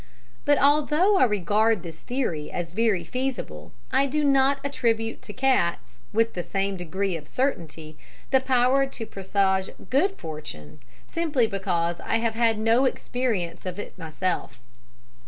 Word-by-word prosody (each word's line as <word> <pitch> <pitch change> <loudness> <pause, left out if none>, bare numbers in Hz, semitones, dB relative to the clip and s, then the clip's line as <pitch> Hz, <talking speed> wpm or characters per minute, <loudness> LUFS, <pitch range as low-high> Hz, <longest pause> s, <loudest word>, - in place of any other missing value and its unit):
"But 290 0 +4
although 300 +8 +4
I 260 - +6
regard 210 0 +2
this 165 -2 -9
theory 230 - -3
as 170 -2 -4
very 210 -2 +1
feasible, 255 +7 -4 0.2
I 270 +2 +3
do 300 +2 0
not 275 0 +4
attribute 230 -5 -1
to - - -9
cats, 170 - 0
with 230 +1 +2
the 175 - -2
same 195 +2 -2
degree 185 +2 -2
of 150 -2 -7
certainty, 160 - -3 0.3
the 265 - +6
power 260 +1 +3
to 240 -4 -7
presage 190 -1 0 0.2
good 380 +10 +2
fortune, 150 - -8 0.3
simply 310 -8 +1
because 175 -5 -1
I - - 0
have 230 -1 0
had 225 -1 +2
no 225 +4 +3
experience 235 -10 -2
of 185 0 -5
it 205 - -7
myself. 165 -7 -3
220 Hz, 145 wpm, -25 LUFS, 175-265 Hz, 0.3 s, I